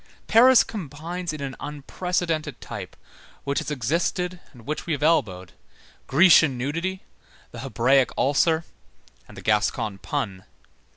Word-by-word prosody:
Paris 250 +3 +6
combines 170 -1 -6
in 155 -2 -7
an 135 -1 -5
unprecedented 160 +3 -3
type, - - -8 0.5
which 140 0 -1
has - - -5
existed 170 - -1
and 120 -4 -16
which 150 +4 -4
we 165 - 0
have 145 0 -3
elbowed, 95 - +1 0.6
Grecian 160 -3 +5
nudity, 165 +9 -3 0.5
the - - -9
Hebraic 130 +2 +2
ulcer, 160 +4 +2 0.6
and - - -14
the - - -9
Gascon 105 -1 0
pun. 100 -10 -4
150 Hz, 125 wpm, -24 LUFS, 130-170 Hz, 0.6 s, Paris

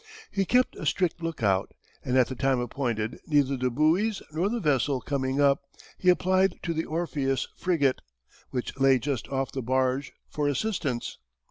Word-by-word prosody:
He 195 -1 0
kept 250 +6 +2
a - - -6
strict 180 -2 0
lookout, 110 - 0 0.3
and 130 +1 +1
at 130 - +6
the - - -5
time 135 0 +1
appointed, 120 -3 -2
neither 145 -3 +3
the 130 -1 0
buoys 165 - +1
nor 170 +6 0
the 240 +2 -1
vessel 140 - +1
coming 135 0 -2
up, 140 -1 +4 0.4
he 185 - +3
applied 185 +1 +3
to 170 - -1
the 160 0 -2
Orpheus 150 -5 -1
frigate, 150 -8 +1 0.5
which 125 -2 -4
lay 135 -1 +5
just 130 0 -3
off 135 -1 -1
the 130 - -3
barge, 130 +2 0 0.2
for 150 -1 -2
assistance. 145 - -2
140 Hz, 165 wpm, -27 LUFS, 130-170 Hz, 0.5 s, at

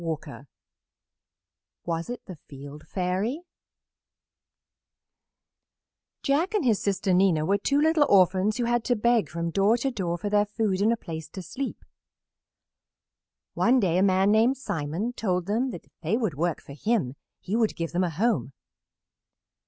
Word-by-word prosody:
[Illustration: 155 -3 -5 1.8
The 185 - -8
Field 145 +2 -11
Fairy] 195 - -2 2.8
Jack 330 +10 +1
and 400 - +1
his 225 -5 +3
sister 195 -1 0
Nina 180 -4 +3
were 200 +4 +2
two 280 +7 +1
little 315 -1 +3
orphans 190 +2 +4
who 245 - 0
had 240 0 +1
to 245 - +2
beg 235 0 +2
from 170 0 -3
door 200 +6 +3
to 270 +3 -1
door 175 -7 -2
for 185 - -4
their 205 0 +2
food 205 -2 -1
and 215 +3 +4
a 235 - +1
place 160 -5 -7
to 190 +1 -8
sleep. 265 - -6 1.7
One 255 +2 +3
day 180 -5 +2
a - - +3
man 190 +1 +3
named 230 +5 +3
Simon 195 - -3
told 180 -7 -1
them 230 +6 0
if 175 - -9 0.2
they 175 +7 0
would 220 - -1
work 165 +3 -2
for 140 - -11
him 185 - 0 0.3
he 195 - -3
would 225 -2 +1
give 165 -1 -3
them 180 +2 +1
a 180 - 0
home. 185 - 0
200 Hz, 150 wpm, -26 LUFS, 170-235 Hz, 2.8 s, orphans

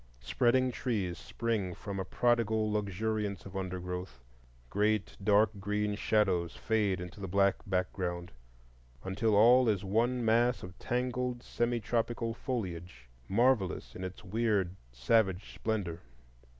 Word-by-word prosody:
Spreading 125 - +2
trees 105 -9 -2
spring 110 -6 -2
from 100 -1 -5
a - - -1
prodigal 110 0 +1
luxuriance 105 0 -2
of 95 0 -10
undergrowth; 90 -3 -4 0.5
great 105 +5 0
dark 105 +1 +4
green 105 +1 -1
shadows 95 -5 +1
fade 105 -4 0
into 90 +2 -8
the 95 - -4
black 100 +1 +3
background, 90 -2 -2 0.7
until 105 +3 +1
all 120 +3 +6
is 100 -3 0
one 115 +5 +1
mass 120 +2 +3
of 90 0 -8
tangled 125 0 -2
semi 120 0 0
tropical 115 +1 -1
foliage, 90 - -5 0.2
marvellous 115 -4 +1
in 95 - -6
its 95 0 -7
weird 100 -3 0 0.2
savage 95 - +1
splendor. 95 -7 -2
105 Hz, 125 wpm, -31 LUFS, 95-115 Hz, 0.7 s, all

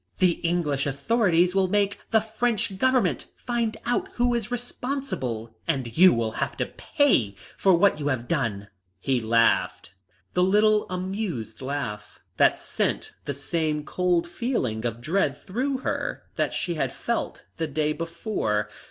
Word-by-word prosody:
The 180 -3 +3
English 160 -5 0
authorities 175 - +2
will 190 -1 +3
make 200 +1 +1
the 220 -1 +4
French 220 -3 -1
Government 245 - +2
find 235 -2 -1
out 245 +1 0
who 245 0 +2
is 235 -2 -2
responsible, 245 - -4
and 130 -8 -1
you 185 +2 +8
will 115 -1 0
have - - -2
to - - 0
pay 185 - +1 0.2
for 190 -2 +4
what 180 -1 +3
you 145 - -2
have 125 -4 -1
done." 110 -10 -1 0.3
He 130 +4 0
laughed 115 -5 +2 0.4
the 180 - +2
little 210 +3 +4
amused 185 - -4
laugh 125 -7 -4 0.2
that - - +5
sent - - -2
the 140 - -3
same 150 +1 -1
cold 180 -2 +1
feeling 170 - -2
of 115 0 -5
dread 155 -1 +1
through 255 - -2
her - - -2
that - - 0
she 175 - -2
had 135 -5 -1
felt 235 - -3
the 160 - -1
day 150 +1 0
before. 165 - -2
170 Hz, 150 wpm, -26 LUFS, 130-215 Hz, 0.4 s, you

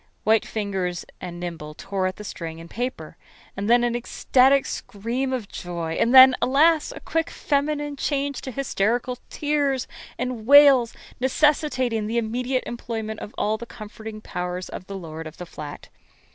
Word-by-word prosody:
White 220 0 +3
fingers 190 -5 -3 0.2
and 175 -1 -6
nimble 160 -4 -6
tore 190 +1 -2
at 185 - -4
the 210 - -9
string 165 -5 -6
and 165 - -10
paper. 250 +3 -4 0.4
And 200 +2 -3
then 240 0 +5
an 240 0 +1
ecstatic 260 +3 +3
scream 235 +6 -3
of 250 -6 -3
joy; 170 -3 -5
and 230 - +3
then, 260 0 +10
alas! 310 +4 +4
a - - -8
quick 325 0 -1
feminine 290 0 -1
change 280 -1 -1
to - - -6
hysterical 245 -1 -1
tears 285 -3 0 0.3
and 245 -3 -4
wails, 280 -4 +8 0.3
necessitating 260 -4 +1
the 230 +2 -1
immediate 245 +3 -1
employment 225 -2 -5
of 210 - -9
all 215 +1 0
the 235 - -8
comforting 215 0 -9
powers 180 -1 -4
of 185 - -8
the 195 - -6
lord 160 -2 -7
of 155 - -11
the 180 - -7
flat. 150 -3 -9
230 Hz, 160 wpm, -24 LUFS, 195-265 Hz, 0.4 s, then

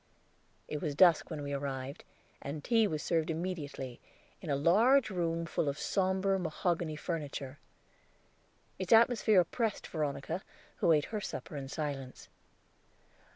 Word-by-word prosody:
It 150 - -4
was 150 -4 -2
dusk 170 0 +5
when 155 -3 -5
we 140 0 -4
arrived, 135 -1 -4 0.4
and 145 +1 -5
tea 225 -3 +3
was 155 -5 -3
served 165 -2 0
immediately, 155 -7 -4 0.4
in 170 - -7
a 140 - +2
large 220 - +4
room 170 -2 -1
full 160 -2 -1
of 140 - -3
somber 190 0 +1
mahogany 170 -1 -1
furniture. 145 -4 -5 1.2
Its - - -4
atmosphere 225 -3 +6
oppressed 220 +5 -2
Veronica, 150 +2 -3 0.4
who 170 - +3
ate 150 -2 +4
her 210 - -1
supper 170 - -6
in 140 -2 -5
silence. 140 -3 -5
160 Hz, 135 wpm, -32 LUFS, 145-185 Hz, 1.2 s, atmosphere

